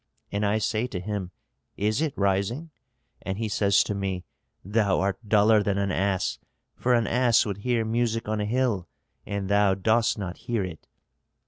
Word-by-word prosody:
And 100 Hz, +1 st, -1 dB
I 105 Hz, +1 st, +2 dB
say 110 Hz, +2 st, 0 dB
to 100 Hz, -7 st, -5 dB
him, 100 Hz, -1 st, -4 dB, 0.5 s
'Is 105 Hz, +6 st, 0 dB
it 155 Hz, -4 st, 0 dB
rising?' 100 Hz, +11 st, 0 dB, 0.5 s
And 95 Hz, 0 st, -4 dB
he 110 Hz, 0 st, -2 dB
says 100 Hz, -1 st, +3 dB
to -, -, -3 dB
me, 95 Hz, -2 st, -3 dB, 0.4 s
'Thou 100 Hz, -1 st, +2 dB
art 100 Hz, +3 st, -2 dB
duller 105 Hz, 0 st, +5 dB
than 100 Hz, -1 st, 0 dB
an 100 Hz, -1 st, 0 dB
ass, 95 Hz, 0 st, 0 dB, 0.4 s
for 125 Hz, 0 st, +2 dB
an 115 Hz, -1 st, +2 dB
ass 120 Hz, -1 st, +3 dB
would 100 Hz, -3 st, -3 dB
hear 120 Hz, +1 st, 0 dB
music 115 Hz, 0 st, 0 dB
on 110 Hz, 0 st, -1 dB
a -, -, -1 dB
hill, 110 Hz, -6 st, 0 dB, 0.4 s
and 100 Hz, -2 st, -3 dB
thou 100 Hz, -1 st, +3 dB
dost 115 Hz, +5 st, +2 dB
not 95 Hz, -3 st, -5 dB
hear 120 Hz, -3 st, -2 dB
it.' 85 Hz, -3 st, -8 dB
105 Hz, 180 wpm, -26 LUFS, 100-115 Hz, 0.5 s, duller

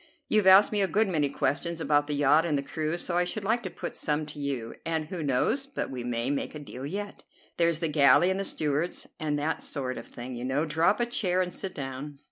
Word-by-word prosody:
You've 210 Hz, -3 st, +3 dB
asked 190 Hz, +2 st, +8 dB
me 210 Hz, -1 st, +2 dB
a 195 Hz, -, +3 dB
good 215 Hz, +3 st, +2 dB
many 155 Hz, -6 st, +1 dB
questions 165 Hz, +5 st, -1 dB
about 145 Hz, -2 st, +2 dB
the 150 Hz, -, -1 dB
yacht 145 Hz, +2 st, +4 dB
and 155 Hz, -4 st, 0 dB
the 140 Hz, -, -2 dB
crew, 155 Hz, +3 st, -2 dB
so 175 Hz, 0 st, -1 dB
I 180 Hz, -, +4 dB
should 200 Hz, +4 st, -3 dB
like 225 Hz, +4 st, +1 dB
to 185 Hz, -, -5 dB
put -, -, -6 dB
some 150 Hz, 0 st, -1 dB
to 150 Hz, -, -10 dB
you, 135 Hz, -5 st, -3 dB
and 160 Hz, -1 st, -1 dB
who 170 Hz, +2 st, -5 dB
knows 150 Hz, -, +1 dB
but 275 Hz, -, -4 dB
we 125 Hz, -2 st, -5 dB
may 120 Hz, +2 st, -1 dB
make 145 Hz, -, -3 dB
a -, -, -5 dB
deal 140 Hz, -2 st, -7 dB
yet. 205 Hz, +5 st, -6 dB, 0.3 s
There's 170 Hz, -1 st, +2 dB
the 165 Hz, -, +1 dB
galley 150 Hz, +4 st, +5 dB
and 190 Hz, -, -1 dB
the -, -, 0 dB
stewards, 155 Hz, -1 st, -1 dB
and 150 Hz, -2 st, -1 dB
that 150 Hz, +2 st, -1 dB
sort 130 Hz, -3 st, -3 dB
of -, -, -11 dB
thing, 125 Hz, +2 st, -8 dB
you 120 Hz, 0 st, -6 dB
know. 135 Hz, +5 st, 0 dB
Draw 160 Hz, +2 st, +2 dB
up 205 Hz, -, +1 dB
a -, -, +3 dB
chair 185 Hz, -6 st, 0 dB
and 180 Hz, -, -6 dB
sit 190 Hz, -2 st, -4 dB
down." 140 Hz, +1 st, -6 dB
155 Hz, 255 wpm, -28 LUFS, 140-180 Hz, 0.3 s, asked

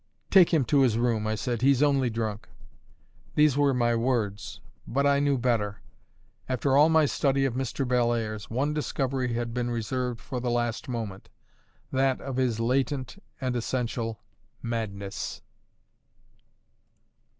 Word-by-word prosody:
"Take 185 Hz, -4 st, +7 dB
him 155 Hz, -6 st, +3 dB
to 140 Hz, +5 st, +3 dB
his 120 Hz, -4 st, +3 dB
room," 115 Hz, -3 st, 0 dB
I 110 Hz, -, 0 dB
said, 120 Hz, +1 st, -2 dB
"he's 135 Hz, +1 st, +4 dB
only 140 Hz, -4 st, +3 dB
drunk." 110 Hz, -1 st, -4 dB, 0.9 s
These 150 Hz, -3 st, +4 dB
were 145 Hz, -1 st, +3 dB
my 120 Hz, -2 st, +2 dB
words; 115 Hz, -4 st, -1 dB, 0.3 s
but 140 Hz, +4 st, 0 dB
I 140 Hz, 0 st, +4 dB
knew 140 Hz, -1 st, +2 dB
better. 115 Hz, -5 st, -1 dB, 0.7 s
After 130 Hz, +1 st, +1 dB
all 150 Hz, +3 st, +6 dB
my 160 Hz, -1 st, +5 dB
study 135 Hz, -1 st, +1 dB
of 135 Hz, -, 0 dB
Mr. 130 Hz, +1 st, -2 dB
Bellairs, 120 Hz, -4 st, 0 dB
one 135 Hz, +6 st, 0 dB
discovery 135 Hz, -4 st, -1 dB
had 115 Hz, 0 st, -3 dB
been 120 Hz, 0 st, -1 dB
reserved 120 Hz, +1 st, -2 dB
for 125 Hz, 0 st, -5 dB
the 120 Hz, 0 st, -2 dB
last 120 Hz, 0 st, -1 dB
moment: 110 Hz, -6 st, -5 dB, 0.6 s
that 130 Hz, 0 st, +1 dB
of 135 Hz, -2 st, -5 dB
his 125 Hz, -4 st, +1 dB
latent 130 Hz, +6 st, -1 dB, 0.2 s
and 130 Hz, -1 st, -2 dB
essential 115 Hz, -2 st, -2 dB, 0.4 s
madness. 100 Hz, -4 st, -4 dB
125 Hz, 140 wpm, -27 LUFS, 115-135 Hz, 0.9 s, Take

